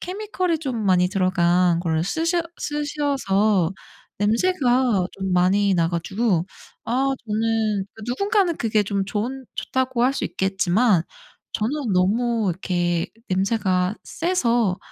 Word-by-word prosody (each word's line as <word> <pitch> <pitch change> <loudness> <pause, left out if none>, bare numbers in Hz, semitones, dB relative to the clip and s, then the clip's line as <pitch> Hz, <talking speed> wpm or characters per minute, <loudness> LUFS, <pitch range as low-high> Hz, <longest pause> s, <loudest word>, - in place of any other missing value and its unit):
케미컬이 370 -3 -2
좀 250 -8 -3
많이 180 -1 +3
들어간 180 -2 +2
걸 160 -2 0
쓰셔 335 - 0 0.2
쓰셔서 270 - 0 0.5
냄새가 245 - +2
좀 190 -1 -3
많이 190 +2 +3
나 165 -1 +2
가지고 180 +1 0 0.4
아 265 +3 +1 0.2
저는 215 -2 0 0.2
누군가는 390 - +1
그게 215 -2 +1
좀 200 -1 -1
좋은 245 +6 -3
좋다고 260 -2 -1
할 265 - +3
수 - - -2
있겠지만 190 0 +2 0.5
저는 240 0 -1
너무 220 +3 +1
이렇게 175 -1 -1 0.2
냄새가 190 -1 +1
세서 240 - 0
215 Hz, 235 characters per minute, -23 LUFS, 185-260 Hz, 0.5 s, 많이